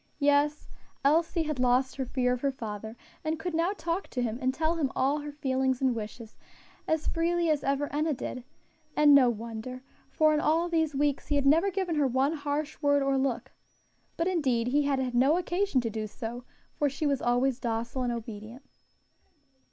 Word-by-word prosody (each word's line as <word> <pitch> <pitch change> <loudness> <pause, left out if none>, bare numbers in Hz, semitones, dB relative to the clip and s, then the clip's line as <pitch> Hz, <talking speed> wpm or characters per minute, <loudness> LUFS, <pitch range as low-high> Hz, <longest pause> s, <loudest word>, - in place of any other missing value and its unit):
Yes, 290 +1 +2 0.4
Elsie 330 +3 +3
had 305 -4 -3
lost 255 +2 +2
her 265 - -1
fear 250 -1 +1
of 250 - -4
her 280 - +2
father, 220 -2 -7 0.3
and 315 0 -1
could 345 +2 -4
now 335 +3 +1
talk 340 +3 -2
to 250 - -3
him, 235 0 -2
and 260 0 +2
tell 320 +4 0
him 290 -5 0 0.3
her 295 0 -6
feelings 265 -3 0
and 260 -2 +2
wishes, 225 0 -7 0.5
as 315 -1 0
freely 335 0 +1
as 295 -2 0
ever 280 +1 0
Enna 305 0 +1
did; 250 0 -6 0.5
and 295 -1 +6
no 265 -3 +7
wonder, 230 +3 -6 0.3
for 310 -1 +3
in 300 - +2
all 320 +3 +2
these 320 -3 0
weeks 285 0 0
he 290 - 0
had 280 -1 +1
never 325 +8 +4
given 380 -2 -2
her 290 -2 +3
one 265 +4 +1
harsh 295 0 -3
word 285 -1 +3
or 275 0 +1
look; 265 -3 -1 0.7
but 335 - 0
indeed 260 -10 +1
he 290 +3 +3
had 280 -1 +1
had 255 -2 -2
no 270 +7 +4
occasion 360 -4 0
to 230 - -2
do 215 0 -3
so, 235 +3 -7 0.3
for 290 - +1
she 280 +3 -4
was 280 -2 +1
always 245 +1 +1
docile 235 +1 -2
and 245 -1 0
obedient. 230 +2 -7
275 Hz, 190 wpm, -28 LUFS, 250-310 Hz, 0.7 s, no